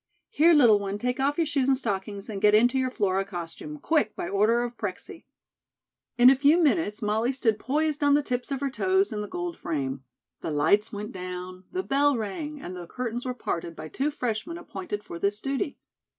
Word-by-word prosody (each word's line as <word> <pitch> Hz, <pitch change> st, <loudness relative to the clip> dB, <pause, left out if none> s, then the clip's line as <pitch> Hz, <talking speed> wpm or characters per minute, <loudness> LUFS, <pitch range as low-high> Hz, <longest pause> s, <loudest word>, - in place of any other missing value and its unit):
"Here, 340 Hz, -6 st, +5 dB
little 235 Hz, -8 st, +6 dB
one, 200 Hz, 0 st, -3 dB
take 250 Hz, +4 st, -2 dB
off 280 Hz, +2 st, +1 dB
your 335 Hz, -, +2 dB
shoes 285 Hz, -3 st, 0 dB
and 270 Hz, -1 st, +4 dB
stockings, 200 Hz, -4 st, -2 dB
and 200 Hz, -3 st, -5 dB
get 210 Hz, 0 st, +6 dB
into 245 Hz, +4 st, +4 dB
your 260 Hz, 0 st, +1 dB
Flora 195 Hz, -5 st, 0 dB
costume, 185 Hz, -, -7 dB
quick, 295 Hz, -7 st, +1 dB
by -, -, -4 dB
order 215 Hz, +5 st, +2 dB
of 240 Hz, 0 st, -5 dB
Prexy." 220 Hz, -, -6 dB, 0.9 s
In 245 Hz, +1 st, +8 dB
a -, -, +5 dB
few 285 Hz, +5 st, +4 dB
minutes, 295 Hz, -, +1 dB
Molly 220 Hz, +4 st, +1 dB
stood 230 Hz, -5 st, 0 dB
poised 300 Hz, +2 st, 0 dB
on 285 Hz, 0 st, +5 dB
the 295 Hz, -, +2 dB
tips 245 Hz, -2 st, -3 dB
of 275 Hz, 0 st, -2 dB
her 280 Hz, -1 st, -1 dB
toes 380 Hz, -, +1 dB
in 210 Hz, -, -3 dB
the 210 Hz, -, -5 dB
gold 355 Hz, -, -4 dB
frame. 135 Hz, -4 st, -3 dB, 0.4 s
The -, -, -4 dB
lights 205 Hz, +9 st, +2 dB
went 210 Hz, 0 st, -5 dB
down, 185 Hz, 0 st, -7 dB
the 370 Hz, +1 st, -2 dB
bell 285 Hz, -2 st, +2 dB
rang, 290 Hz, +8 st, -4 dB
and 185 Hz, -8 st, -7 dB
the 175 Hz, -1 st, -8 dB
curtains 245 Hz, +2 st, -4 dB
were 250 Hz, -, -2 dB
parted 170 Hz, -7 st, -4 dB
by 155 Hz, 0 st, -8 dB
two 275 Hz, -, -1 dB
freshmen 255 Hz, +3 st, -3 dB
appointed 210 Hz, -, -6 dB
for 170 Hz, -, -8 dB
this 200 Hz, +2 st, 0 dB
duty. 275 Hz, +3 st, -2 dB
240 Hz, 210 wpm, -26 LUFS, 200-285 Hz, 0.9 s, In